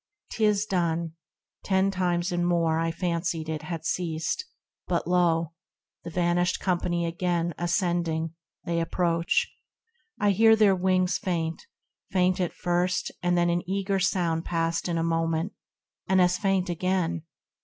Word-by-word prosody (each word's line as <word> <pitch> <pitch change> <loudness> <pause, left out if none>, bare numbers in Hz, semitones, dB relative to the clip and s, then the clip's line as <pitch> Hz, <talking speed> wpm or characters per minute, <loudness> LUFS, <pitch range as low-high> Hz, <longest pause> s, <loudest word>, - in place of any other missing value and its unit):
'Tis 210 -2 +2
done, 170 -4 0 0.5
Ten 190 0 +2
times 180 -1 0
and 175 0 0
more 165 -2 +2
I 165 0 0
fancied 170 -1 -2
it 155 -1 -3
had 160 0 -6
ceased, 170 - -1 0.4
But 175 -2 0
lo! 170 -2 +2 0.5
the 170 - -6
vanished 175 +1 +1
company 175 -2 0
again 170 0 -1
Ascending, 170 -3 0 0.3
they 170 0 -1
approach. 170 0 +1 0.7
I 205 -1 +3
hear 220 +3 +6
their 210 -3 +4
wings 185 0 +1
Faint, 165 -3 -3 0.4
faint 185 0 +2
at 175 - -1
first; 180 +1 0
and 175 0 +1
then 175 0 +3
an 175 0 +1
eager 195 0 0
sound 175 -4 +1
Passed 165 0 -1
in 170 - 0
a 165 - 0
moment 165 +2 0 0.3
— - - -61
and 190 0 +4
as 180 0 +4
faint 195 -1 +1
again 175 -1 -1
175 Hz, 145 wpm, -27 LUFS, 165-185 Hz, 0.7 s, hear